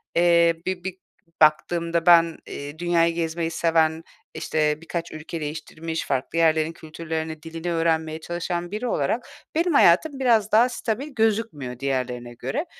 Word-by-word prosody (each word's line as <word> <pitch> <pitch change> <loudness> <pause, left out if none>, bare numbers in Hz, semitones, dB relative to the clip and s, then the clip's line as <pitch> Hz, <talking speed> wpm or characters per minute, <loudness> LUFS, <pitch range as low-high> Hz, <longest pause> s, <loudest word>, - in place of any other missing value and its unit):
eee, 170 -1 +4
bir 185 -1 -3
bir 190 0 -5 0.4
baktığımda 165 +2 +2
ben, 170 -2 +6
eee, 145 +2 -7
dünyayı 170 -1 +2
gezmeyi 165 0 -2
seven, 160 -1 +1 0.3
işte, 150 0 0
birkaç 170 0 -5
ülke 155 +1 -7
değiştirmiş, 155 +2 -5
farklı 135 +4 -2
yerlerin 160 -1 +3
kültürlerini, 160 -1 -6
dilini 165 +1 -5
öğrenmeye 160 -1 0
çalışan 175 +1 -4
biri 215 +4 -3
olarak 225 - -1 0.3
benim 335 +1 +2
hayatım, 275 - +4
biraz 225 -5 +3
daha 230 +4 +5
stabil 245 +2 -3
gözükmüyor 215 - -1
diğerlerine 125 -3 -3
göre 295 - -3
165 Hz, 135 wpm, -24 LUFS, 155-175 Hz, 0.4 s, ben